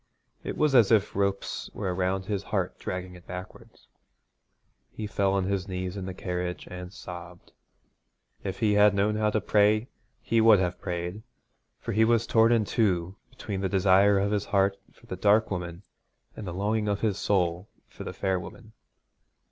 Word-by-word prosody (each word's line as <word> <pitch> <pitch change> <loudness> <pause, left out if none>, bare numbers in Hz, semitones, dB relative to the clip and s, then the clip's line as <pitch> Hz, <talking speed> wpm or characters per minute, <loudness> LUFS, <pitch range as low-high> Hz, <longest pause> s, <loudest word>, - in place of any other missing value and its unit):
It - - -5
was 150 -2 +2
as 120 -5 +6
if 105 -3 +3
ropes 100 0 -1
were 95 -3 -2
around 95 +1 -1
his 100 -1 -2
heart - - -3
dragging 90 0 -5
it 90 -1 -15
backward. 90 +1 -8 1.2
He 110 - -6
fell 100 -1 0
on 100 -1 +1
his 95 0 -2
knees 90 0 -4
in 95 -2 -5
the 95 - -4
carriage, 90 -1 -4
and 90 0 -7
sobbed. 90 -2 -10 0.9
If 95 +4 -5
he 105 -2 +3
had 105 0 +5
known 105 +2 +1
how 105 0 +1
to 110 - +1
pray 105 +3 +2 0.3
he 115 -1 +1
would 110 -1 +7
have 90 -1 -2
prayed, 90 +3 -4 0.6
for - - -5
he 110 +2 +3
was 115 0 +3
torn 115 0 +4
in 115 -3 +3
two 95 -5 0
between 100 -3 -5
the 95 - 0
desire 95 +1 +4
of 100 +1 +1
his 105 -1 0
heart 100 0 +2 0.2
for 120 - -22
the 95 - -5
dark 105 +4 +3
woman, 90 -1 -5 0.5
and 105 - -7
the - - -3
longing 105 +4 -1
of 100 -1 -1
his 105 -3 0
soul 90 -1 0 0.2
for - - -10
the - - -5
fair 95 -1 -1
woman. 110 +6 -11
100 Hz, 180 wpm, -27 LUFS, 90-105 Hz, 1.2 s, would